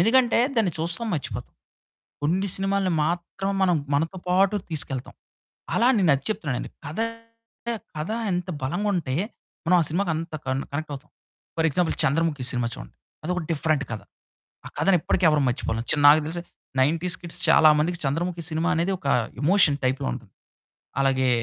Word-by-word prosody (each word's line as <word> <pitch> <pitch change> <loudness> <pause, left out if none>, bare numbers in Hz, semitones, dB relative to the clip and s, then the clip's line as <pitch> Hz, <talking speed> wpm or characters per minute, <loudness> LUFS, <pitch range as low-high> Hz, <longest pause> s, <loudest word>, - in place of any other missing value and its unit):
ఎందుకంటే 240 +5 +4 0.2
దాన్ని 210 -6 +2
చూస్తాం, 175 +8 0
మర్చిపోతాం. 145 - -5 0.7
కొన్ని 185 +6 +1
సినిమాల్ని 195 -1 0
మాత్రం 175 +4 -2
మనం, 180 -2 +4 0.2
మనతో 165 +6 0
పాటు 190 +3 +3
తీసుకెళ్తాం. 135 -5 -2 0.6
అలా 235 - +4
నేనది 150 -9 +3
చెప్తున్నానండి. 155 - -3 0.2
కథ 155 +8 -6 1.0
కథ 155 +6 -3 0.2
ఎంత 180 +1 -2
బలంగుంటే, 175 -1 -1 0.5
మనం 180 +2 +4
ఆ - - +2
సినిమాకి 175 +2 0
అంత 165 +1 -5
కన్ 130 +1 -1
కనెక్టవుతాం. 145 -1 -5 0.5
ఫర్ 160 0 +3
ఎగ్జాంపుల్ 165 +4 0
'చంద్రముఖి' 145 -2 +1
సినిమా 120 -2 -1
చూడండి, - - -11 0.3
అదొక 180 +3 -1
డిఫరెంట్ 155 -2 +1
కథ. 110 - -4 0.7
ఆ - - -5
కథని 195 -2 +4
ఇప్పటికి 185 - 0
ఎవరు 150 -1 +2
మర్చిపోలేము, 115 -2 -2
చి - - +2
నాకు 150 +2 +7
తెలిసి 170 +2 -3 0.4
90స్ 165 +5 +1
కిడ్స్ 170 -1 -3
చాలా 155 - +7
మందికి, 170 +3 0
'చంద్రముఖి' 170 +4 -1
సినిమా 160 +2 0
అనేది 170 +4 +1
ఒక 145 - -10 0.4
ఎమోషన్ 160 -3 +4
టైప్‌లో 130 +1 -1
ఉంటది. 115 -6 -11 0.7
అలాగే 130 -1 +2
165 Hz, 145 wpm, -25 LUFS, 140-180 Hz, 1.0 s, నాకు